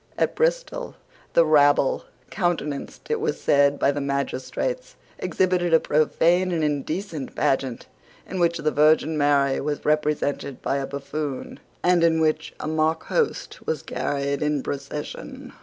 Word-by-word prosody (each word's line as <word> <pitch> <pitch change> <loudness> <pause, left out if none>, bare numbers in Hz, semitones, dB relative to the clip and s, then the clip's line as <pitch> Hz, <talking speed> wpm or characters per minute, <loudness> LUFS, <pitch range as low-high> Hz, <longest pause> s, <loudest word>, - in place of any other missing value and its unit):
At - - +1
Bristol - - -1 0.4
the 170 - +5
rabble, 145 -3 +4 0.3
countenanced, 170 - -2
it 455 - +1
was 450 +1 -1
said, 140 0 +3
by 140 - +3
the 145 0 -3
magistrates, 140 - -3 0.2
exhibited 180 -2 +2
a - - +6
profane 170 +5 +2
and 165 -2 0
indecent 155 +1 -3
pageant, 135 -3 0 0.4
in 185 - -4
which 170 -1 +2
the 155 0 0
Virgin 155 +1 +3
Mary 140 -2 +2
was 145 0 -3
represented 150 -2 0
by 140 - -1
a 135 -1 -3
buffoon, 140 0 -5 0.2
and 175 -1 +4
in 165 -1 +4
which 155 0 0
a - - -4
mock 155 +1 +1
host 470 -3 -1
was 470 - -1
carried 140 0 -2
in 150 -2 0
procession. 140 +1 -6
155 Hz, 140 wpm, -24 LUFS, 140-175 Hz, 0.4 s, a